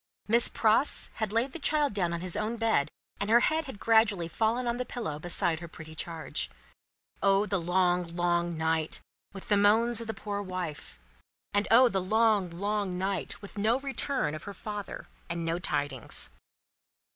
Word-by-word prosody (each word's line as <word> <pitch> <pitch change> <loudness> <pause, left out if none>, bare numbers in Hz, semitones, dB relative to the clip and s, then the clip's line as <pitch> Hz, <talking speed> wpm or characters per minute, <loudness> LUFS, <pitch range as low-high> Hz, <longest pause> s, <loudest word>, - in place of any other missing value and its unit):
Miss 235 +2 +4
Pross 225 +6 +2
had 215 -2 0
laid 230 +5 +1
the 335 - -7
child 295 -3 +2
down 180 -4 0
on 170 0 -3
his 180 -1 -4
own 215 +2 -2
bed, 220 -11 +2 0.3
and 205 - -2
her 235 +2 +6
head 315 +3 +1
had 265 -7 -8
gradually 220 -7 +3
fallen 225 +7 0
on 235 0 0
the 250 - -1
pillow 225 -12 -5
beside 170 -1 +1
her 170 - -8
pretty 160 -1 -11
charge. 160 +1 -3 0.7
O 195 +1 +4
the 195 -4 -1
long, 175 -1 +1
long 175 -1 0
night, 160 0 0 0.3
with 195 -2 -10
the 205 - +4
moans 225 +3 +4
of 230 - -7
the 220 - -3
poor 205 -1 -4
wife! 180 - -6 0.6
And 205 +1 +2
O 250 +3 +7
the 195 -5 0
long, 215 -1 +2
long 200 +1 -2
night, 190 +1 -2
with 200 +1 -8
no 220 +4 +3
return 270 - -1
of 155 - -7
her 200 -1 -7
father 210 -2 -6 0.2
and 170 0 -3
no 165 +1 -1
tidings! 145 -7 -2
200 Hz, 180 wpm, -29 LUFS, 170-225 Hz, 0.7 s, O